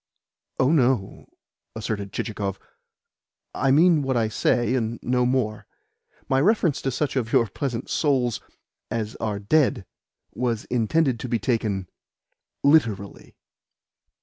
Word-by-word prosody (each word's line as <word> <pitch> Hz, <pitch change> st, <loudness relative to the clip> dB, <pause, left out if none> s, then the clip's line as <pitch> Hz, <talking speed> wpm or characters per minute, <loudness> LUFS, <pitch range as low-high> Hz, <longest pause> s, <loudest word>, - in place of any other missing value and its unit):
"Oh, 130 Hz, +3 st, +3 dB
no," 125 Hz, -9 st, +1 dB, 0.5 s
asserted 105 Hz, -3 st, -4 dB
Chichikov. 100 Hz, -3 st, -3 dB, 1.0 s
"I 135 Hz, -, 0 dB
mean 160 Hz, +3 st, +5 dB
what 135 Hz, -2 st, 0 dB
I 110 Hz, -2 st, +1 dB
say 120 Hz, +2 st, +1 dB
and 115 Hz, -2 st, -1 dB
no 125 Hz, 0 st, +1 dB
more. 115 Hz, -5 st, -1 dB, 0.6 s
My 135 Hz, 0 st, +2 dB
reference 180 Hz, -4 st, +2 dB
to 135 Hz, -, -1 dB
such 135 Hz, +2 st, -2 dB
of 120 Hz, -4 st, -1 dB
your 115 Hz, -, +4 dB
pleasant 120 Hz, +3 st, -4 dB
souls 130 Hz, -6 st, 0 dB, 0.5 s
as 110 Hz, -1 st, -3 dB
are 105 Hz, -2 st, -2 dB
dead 120 Hz, +1 st, +1 dB, 0.5 s
was 120 Hz, -2 st, -2 dB
intended 125 Hz, +2 st, +1 dB
to 125 Hz, -, -5 dB
be 120 Hz, -, +1 dB
taken 105 Hz, -4 st, -1 dB, 0.8 s
literally." 115 Hz, -10 st, +1 dB
120 Hz, 120 wpm, -24 LUFS, 110-135 Hz, 1.0 s, mean